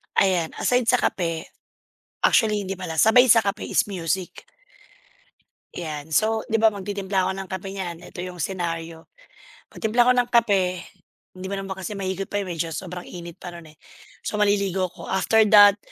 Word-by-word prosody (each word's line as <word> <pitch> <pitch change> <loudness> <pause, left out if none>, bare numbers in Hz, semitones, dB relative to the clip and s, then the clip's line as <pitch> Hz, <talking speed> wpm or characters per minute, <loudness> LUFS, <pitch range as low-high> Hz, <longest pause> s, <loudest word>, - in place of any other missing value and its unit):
Ayan, 180 -4 +2
aside 245 -1 +1
sa 250 - +5
kape, 165 -8 -1 0.8
actually 215 -2 +3
hindi 195 - -3
pala. 180 -4 -6
Sabay 245 +5 +6
sa 230 - +8
kape 205 -2 -1
is - - +2
music. 185 -1 -2 1.4
'Yan. 155 -2 -6
So, 220 +5 +1
'di 225 0 0
ba 225 - +7
magtitimpla 200 -2 -2
ako 190 - 0
ng 190 - -9
kape 190 +1 -5
niyan, 180 -4 -5
eto 175 - -8
yung 180 0 -7
senaryo, 165 -2 -4 0.6
pagtimpla 235 +2 +1
ko 250 - +5
ng 245 -1 +1
kape 195 -7 +2 0.5
hindi 185 - -8
mo 190 - -4
naman 195 -1 -6
kasi 190 +2 -5
mahigop 195 -1 -3
pa, 205 +1 -2
medyo 170 -3 -4
sobrang 180 +1 -6
init 170 -2 -9
pa 175 - -9
nun, 170 -2 -11
eh. 155 - -20 0.5
So - - -3
maliligo 200 -3 +1
ako, 175 -1 -12
after 220 +3 +3
that, 205 -1 +8
190 Hz, 170 wpm, -23 LUFS, 175-210 Hz, 1.4 s, sa